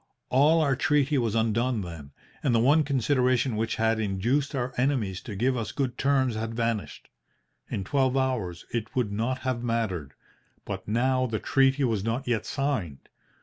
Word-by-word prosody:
All 150 Hz, +5 st, +4 dB
our 140 Hz, -3 st, +2 dB
treaty 145 Hz, 0 st, +2 dB
was 115 Hz, -3 st, 0 dB
undone 115 Hz, +1 st, +1 dB
then, 85 Hz, -6 st, -8 dB, 0.3 s
and 125 Hz, -5 st, +2 dB
the -, -, +4 dB
one 145 Hz, +7 st, +5 dB
consideration 130 Hz, -2 st, +1 dB
which 110 Hz, +1 st, -1 dB
had 110 Hz, 0 st, +1 dB
induced 115 Hz, +8 st, 0 dB
our 125 Hz, -1 st, -2 dB
enemies 125 Hz, -8 st, 0 dB
to 105 Hz, -, -7 dB
give 125 Hz, +6 st, +1 dB
us 115 Hz, -4 st, -3 dB
good 130 Hz, -4 st, -2 dB
terms 135 Hz, -3 st, +2 dB
had 115 Hz, +1 st, -4 dB
vanished. 115 Hz, -2 st, -2 dB, 0.6 s
In 100 Hz, -, -3 dB
twelve 130 Hz, +4 st, +1 dB
hours 115 Hz, -10 st, -1 dB
it 115 Hz, -2 st, -4 dB
would 120 Hz, -5 st, 0 dB
not 120 Hz, +5 st, -2 dB
have 130 Hz, -2 st, -2 dB
mattered. 110 Hz, -, -2 dB, 0.5 s
But -, -, -6 dB
now 130 Hz, +4 st, +1 dB
the 110 Hz, -2 st, -2 dB
treaty 135 Hz, +4 st, +2 dB
was 110 Hz, -6 st, 0 dB
not 115 Hz, +5 st, -2 dB
yet 120 Hz, -3 st, 0 dB
signed. 130 Hz, -, -3 dB
120 Hz, 170 wpm, -27 LUFS, 110-130 Hz, 0.6 s, one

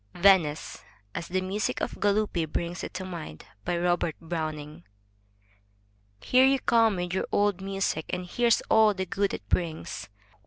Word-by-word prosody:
VENICE 175 Hz, -5 st, +3 dB, 0.3 s
{As 170 Hz, -, -4 dB
the 185 Hz, +1 st, -1 dB
music 195 Hz, +3 st, -2 dB
of -, -, -4 dB
Galuppi 205 Hz, -5 st, +1 dB
brings 175 Hz, +1 st, -3 dB
it -, -, -5 dB
to 185 Hz, 0 st, -4 dB
mind) 165 Hz, -, -8 dB, 0.2 s
Robert 175 Hz, -2 st, +1 dB
Browning 155 Hz, -1 st, -5 dB, 1.4 s
Here 255 Hz, -, +4 dB
you 270 Hz, 0 st, +4 dB
come 230 Hz, -4 st, +3 dB
with 180 Hz, 0 st, -3 dB
your 190 Hz, -, -1 dB
old 205 Hz, -2 st, +2 dB
music, 195 Hz, -5 st, -2 dB
and 180 Hz, 0 st, -3 dB
here's 235 Hz, +5 st, +2 dB
all 220 Hz, -2 st, +4 dB
the 190 Hz, 0 st, -2 dB
good 195 Hz, +2 st, 0 dB
it -, -, -6 dB
brings. 160 Hz, -, -2 dB
185 Hz, 150 wpm, -27 LUFS, 170-200 Hz, 1.4 s, Here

